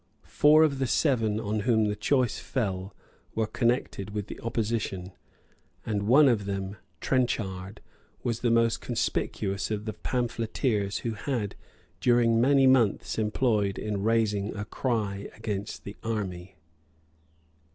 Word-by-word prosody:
Four 155 +2 +5
of 140 -4 +1
the 135 - +1
seven 115 -7 +2
on 110 -1 -2
whom 110 0 +2
the 105 0 0
choice 125 +1 +1
fell 95 -5 -3 0.4
were 110 - +1
connected 110 -3 -1
with 105 -2 -2
the - - -9
opposition; 110 -5 -2 0.7
and 105 -2 -1
one 140 +5 +7
of 110 -6 +2
them, 100 0 -4 0.2
Trenchard, 100 -7 -1 0.4
was 115 -2 -1
the 120 - +1
most 115 0 +2
conspicuous 95 0 -2
of 105 -1 -3
the 110 - -3
pamphleteers 115 -4 -1
who 115 - 0
had 110 -1 -2
been - - -17 0.4
during 115 -2 +4
many 135 +1 +5
months 120 -5 +3
employed 105 -2 +1
in 105 -2 -3
raising 105 -2 +1
a 105 0 -4
cry 105 -6 -2
against 105 -2 -4
the 100 - -8
army. 95 -5 -4
110 Hz, 135 wpm, -28 LUFS, 100-120 Hz, 0.7 s, one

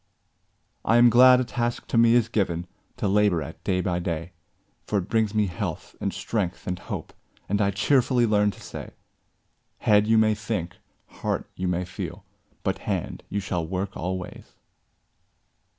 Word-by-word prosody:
I 115 - +4
am 120 0 +7
glad 125 +1 +8
a - - +2
task 120 0 -2
to - - -2
me 115 0 +6
is 120 -2 +4
given 90 -7 -1 0.3
To - - -1
labor 100 -5 +3
at 80 - -10
day 90 -2 +1
by 90 -2 -1
day; 85 0 -3 0.6
For 105 - +1
it 95 -1 -2
brings 110 -2 +1
me 105 -1 +3
health, 90 -3 -5
and - - 0
strength, 100 -6 -3
and 90 -1 -3
hope, - - -6 0.3
And 100 +2 +1
I 100 - +3
cheerfully 120 +4 +3
learn 105 -2 +3
to - - -8
say - - -8 0.8
'Head, 105 0 +3
you 110 0 +4
may 110 0 +4
think; 105 -5 -4 0.3
heart, - - -3
you 90 - -2
may 90 0 0
feel; 90 - -7 0.4
But - - -1
hand, - - -3
you 100 - -1
shall 90 -4 -2
work 95 +2 -3
always!' 90 +1 -5
100 Hz, 165 wpm, -25 LUFS, 90-110 Hz, 0.8 s, glad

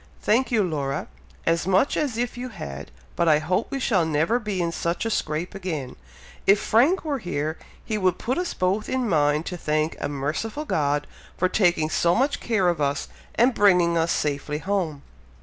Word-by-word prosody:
"Thank 250 +5 +2
you, 220 -3 +3
Laura, 145 -6 -2 0.4
as 165 +1 +1
much 195 +8 +3
as 275 -7 -1
if 240 0 -2
you 250 +1 -5
had, 70 - -7 0.3
but 170 - +1
I 150 - +6
hope 180 +8 -1
we 275 - -3
shall 200 -9 +2
never 160 +9 +1
be 210 -5 -3
in 170 -1 0
such 170 +4 -2
a 225 - -1
scrape 155 -2 -2
again! 160 -9 -4 0.5
If 200 +1 +6
Frank 275 - +3
were 285 -3 -1
here, 155 -5 -3 0.3
he 215 -2 -2
would 185 -2 +2
put 255 +7 -1
us 360 - -3
both 190 +4 0
in 260 -2 0
mind 150 -3 +2
to 180 - -4
thank 155 0 0
a - - -2
merciful 155 - -3
God 145 - 0 0.3
for 185 - +2
taking 175 -5 +2
so 170 +1 +2
much 270 +4 +1
care 210 -6 +1
of 170 -3 +1
us, 140 0 -1 0.3
and 245 +3 +4
bringing 180 -5 +4
us 165 0 +2
safely 150 0 -1
home!" 165 -5 -2
180 Hz, 190 wpm, -24 LUFS, 155-220 Hz, 0.5 s, I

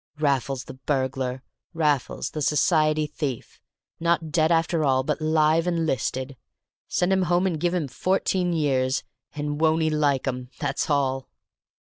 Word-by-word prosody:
Raffles 135 -3 0
the - - -9
burglar! 130 -1 -2 0.3
Raffles 150 -5 0
the 155 - -4
society 155 +1 +2
thief! 145 -4 -5 0.4
Not 170 -2 0
dead 160 +2 +2
after 165 -1 +2
all, 130 -2 +2
but 150 +2 -2
'live 155 +1 +3
and 170 -2 0
'listed. 130 -1 -2 0.5
Send 180 +2 +1
him 190 - +2
home 175 +1 +3
and 170 -5 0
give 175 +2 0
him 165 -5 -1
fourteen 185 +5 0
years, 135 -5 +1 0.3
and 145 0 -3
won't 160 0 +3
he 155 - +1
like 145 -3 +1
'em, 125 -1 -3
that's 145 -1 -2
all!" 135 -2 0
150 Hz, 150 wpm, -25 LUFS, 135-165 Hz, 0.5 s, live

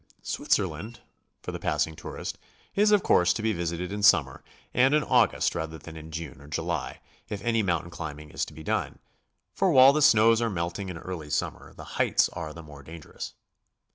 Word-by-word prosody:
Switzerland, 115 +4 -1 0.4
for - - -4
the - - -6
passing 80 - -1
tourist, - - -7 0.3
is 210 +1 +4
of 210 -2 +4
course 90 0 +4
to 110 - -5
be 110 0 +1
visited 85 0 -3
in 105 0 -4
summer, 85 -11 +4 0.3
and 130 +4 +4
in 150 - +2
August - - +3
rather 80 0 -4
than 80 +1 -11
in 80 0 -9
June 80 -4 -7
or 70 - -13
July, 75 - -3 0.3
if 105 - -4
any 115 -1 +2
mountain 85 -3 -1
climbing 75 -3 -7
is - - -2
to - - -6
be 80 - -9
done, - - -2 0.6
for 195 - +2
while 135 -1 +8
the 150 - +1
snows 115 -5 +6
are 115 - +1
melting 95 +1 -3
in 90 - -6
early 80 -3 -7
summer, - - -3
the - - -10 0.2
heights - - +3
are 80 -2 -6
the 85 +2 -10
more 75 -2 -12
dangerous. 80 +2 -9
85 Hz, 195 wpm, -27 LUFS, 80-110 Hz, 0.6 s, while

